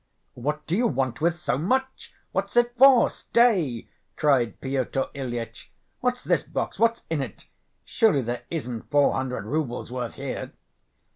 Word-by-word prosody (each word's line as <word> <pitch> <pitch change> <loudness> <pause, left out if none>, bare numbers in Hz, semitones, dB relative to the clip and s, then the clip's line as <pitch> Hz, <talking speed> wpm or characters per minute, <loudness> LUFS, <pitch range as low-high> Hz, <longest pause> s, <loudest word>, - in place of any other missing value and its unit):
"What 150 +4 -3
do 170 - -1
you 235 +4 +3
want 130 -1 -1
with 170 +1 +2
so 130 -5 -1
much? 260 - -1 0.2
What's - - -2
it 240 0 +3
for? 260 -1 +7
Stay!" 185 - +1 0.3
cried 135 -6 +2
Pyotr 135 0 -1
Ilyitch. 120 -4 -6 0.3
"What's 250 0 -1
this - - +2
box? - - -4
What's 230 0 +2
in 155 -3 0
it? 125 -7 -7 0.4
Surely 200 - +2
there 120 +1 -3
isn't 125 -9 -5
four 145 -1 +4
hundred 125 -6 -3
roubles' 125 -2 -3
worth 125 -2 -4
here?" - - -5
145 Hz, 150 wpm, -25 LUFS, -, 0.4 s, for